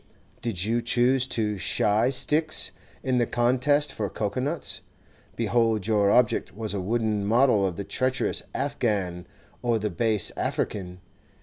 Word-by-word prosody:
Did 100 -6 -2
you 115 +2 +1
choose 125 +2 +2
to 105 -5 -1
'shy' 105 +6 +2
sticks 150 +4 +2 0.3
in 130 -2 +1
the 120 - +1
contest 130 +5 +2
for 105 -2 -3
cocoa 105 +4 -3
nuts, 145 +6 -2 0.5
behold 115 -2 +1
your 105 -2 +3
object 120 -4 +2
was 110 -2 -3
a 100 - -2
wooden 110 +1 0
model 115 0 +3
of 90 - -4
the 100 - -4
treacherous 130 +6 0
Afghan 105 -11 -1 0.3
or 120 -2 +1
the 105 -1 -2
base 110 +2 +1
African. 90 -2 -3
115 Hz, 140 wpm, -26 LUFS, 105-125 Hz, 0.5 s, your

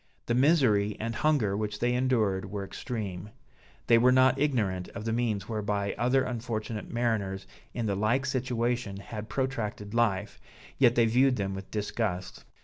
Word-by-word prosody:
The 120 - 0
misery 120 -7 +3
and 115 +1 -2
hunger 115 -5 +1
which 105 0 -2
they 120 +3 +1
endured, 110 -7 +1
were 100 0 -4
extreme; 105 -3 -5 0.6
they 115 - +5
were 125 +2 +5
not 130 0 +4
ignorant 105 -11 0
of 105 - -6
the 115 - 0
means 110 -4 -1
whereby 105 -2 -1
other 125 +2 +2
unfortunate 115 -3 -4
mariners 110 -5 -1 0.3
in 120 - -2
the 100 - 0
like 110 +7 +1
situation 120 -5 -1
had 105 +2 -7
protracted 115 -6 -3
life, 105 -4 0 0.4
yet 120 -3 +5
they 115 - +5
viewed 125 +3 +3
them 100 -3 -2
with 95 0 -7
disgust. 105 -3 -3
110 Hz, 155 wpm, -28 LUFS, 100-125 Hz, 0.6 s, they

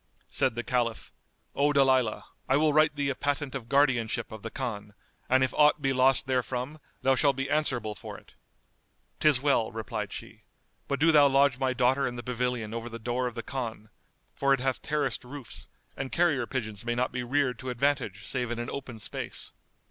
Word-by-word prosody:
Said - - +1
the 120 - -3
Caliph, 115 0 -1 0.4
"O 145 +1 +2
Dalilah, 130 -5 +3 0.3
I 135 - +4
will 155 0 +3
write 155 0 +4
thee 140 -1 0
a - - -3
patent 145 -1 -2
of 120 -4 -6
guardianship 120 -5 +2
of 110 -1 -8
the 115 - -5
Khan, 105 -6 -5 0.3
and 130 +1 +4
if 130 - 0
aught 150 0 +5
be 135 -2 +1
lost 130 +1 +4
therefrom, 130 +3 -2 0.2
thou 135 - +4
shalt 140 +1 +3
be 135 +1 -2
answerable 125 -8 +1
for - - -9
it." - - -18 0.9
"'Tis 150 -4 +4
well," 135 -6 +2
replied 110 0 -4
she; - - -8 0.5
"but 140 - -1
do 165 +2 +5
thou 145 -2 +7
lodge 135 -1 +3
my 130 -1 +1
daughter 130 +3 +2
in 125 - -4
the 120 - -6
pavilion 125 -3 -2
over 115 +1 -4
the 115 - -7
door 120 +2 -1
of 120 - -6
the 115 - -4
Khan, 110 -4 -5 0.4
for 140 0 +3
it - - -9
hath 130 0 -1
terraced 150 -1 -1
roofs, 130 -1 -8 0.3
and 135 -1 -5
carrier 150 -9 +2
pigeons 110 -6 -4
may 120 0 -1
not 125 +1 0
be 125 - -3
reared 130 +1 0
to 130 - -5
advantage 125 -4 -1
save 125 -3 -1
in 120 - -3
an 120 0 -4
open 130 -4 -6
space." 110 - -5
130 Hz, 200 wpm, -28 LUFS, 120-140 Hz, 0.9 s, thou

